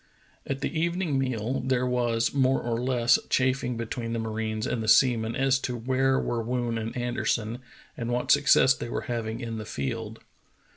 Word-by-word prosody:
At 135 0 -3
the 155 +3 -2
evening 170 -4 0
meal 125 -1 -1
there 130 -1 0
was 120 -2 0
more 135 -1 +3
or 120 0 -2
less 125 -2 +3
chaffing 130 -2 +1
between 115 0 -4
the - - -1
marines 110 -1 -3
and 115 - -2
the 110 - -4
seamen 115 -1 +4
as 135 0 +2
to 125 -2 -3
where 130 +3 +1
were 120 -1 -1
Woon 120 0 -2
and 115 +2 -5
Anderson 120 -1 -1 0.4
and 120 0 -4
what 125 +2 0
success 145 -2 +5
they 120 - -6
were - - -2
hav 115 -2 -3
ing 110 +1 -4
in 115 -2 -4
the - - -5
field. 115 -1 -4
120 Hz, 185 wpm, -27 LUFS, 115-130 Hz, 0.4 s, success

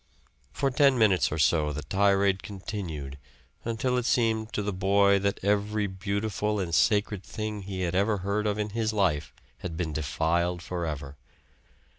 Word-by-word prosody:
For 140 -1 0
ten 135 -1 +4
minutes 105 -5 +3
or 75 - -2
so 75 0 +3
the 75 +1 -5
tirade 100 -1 +2
continued 90 -8 -6 0.4
until 125 +2 0
it 120 - -4
seemed 110 -2 +1
to 105 - -1
the 100 0 -2
boy 100 +1 +3
that 100 0 -1
every 105 +1 +1
beautiful 100 +2 -2
and 85 -3 -3
sacred 105 0 +2
thing 110 -1 -5
he 95 -1 -5
had 90 -1 -1
ever 100 +3 +2
heard 105 +2 0
of 105 0 0
in 105 0 -2
his 110 0 -1
life 95 -8 +1 0.3
had 80 -1 -5
been 80 -3 -2
defiled 85 +4 0
forever. 75 -6 -4
100 Hz, 160 wpm, -27 LUFS, 85-105 Hz, 0.4 s, ten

